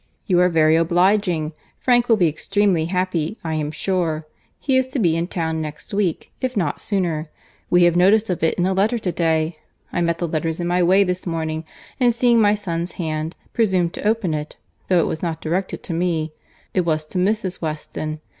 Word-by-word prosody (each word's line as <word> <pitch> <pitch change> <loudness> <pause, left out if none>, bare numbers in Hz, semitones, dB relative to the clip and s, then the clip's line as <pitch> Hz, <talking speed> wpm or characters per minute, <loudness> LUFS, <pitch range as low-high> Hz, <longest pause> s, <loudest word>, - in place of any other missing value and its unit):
"You 180 -5 +3
are 180 0 +5
very 160 -2 +4
obliging.—Frank 180 +6 +1
will 225 - +5
be 175 -4 +4
extremely 185 +2 +1
happy, 180 +1 -1
I 160 -1 -2
am 155 -1 -1
sure.— 160 -1 -1 0.3
He 270 -3 0
is 260 0 +3
to 260 - -5
be 170 -9 +2
in 165 +1 -1
town 160 -3 -2
next 150 +3 -7
week, 195 -5 -1
if 255 -3 -2
not 170 -7 -1
sooner. 170 -6 -1 0.4
We 175 0 +5
have 175 -1 +4
notice 205 +5 +4
of 180 - -3
it 160 - +2
in 175 - +1
a 190 - +1
letter 205 +5 +2
to 195 -5 -2
day. 160 -1 0 0.3
I - - 0
met 170 -1 +1
the 170 - -2
letters 160 +1 -2
in 175 - -2
my 175 +1 +1
way 185 +3 +5
this 180 -1 -3
morning, 160 -1 -2 0.3
and 245 -3 +3
seeing 235 -1 +4
my 205 0 +4
son's 175 -4 -4
hand, 155 -1 -3 0.2
presumed 185 -7 +1
to - - -3
open 215 -7 +1
it—though 155 +4 -3
it - - +2
was 160 - -3
not 165 -2 -2
directed 180 +5 -2
to 175 - -4
me—it 165 +1 -3
was 155 -3 0
to 180 +4 -3
Mrs. 190 -1 0
Weston. 155 -1 -4
175 Hz, 195 wpm, -21 LUFS, 160-195 Hz, 0.4 s, are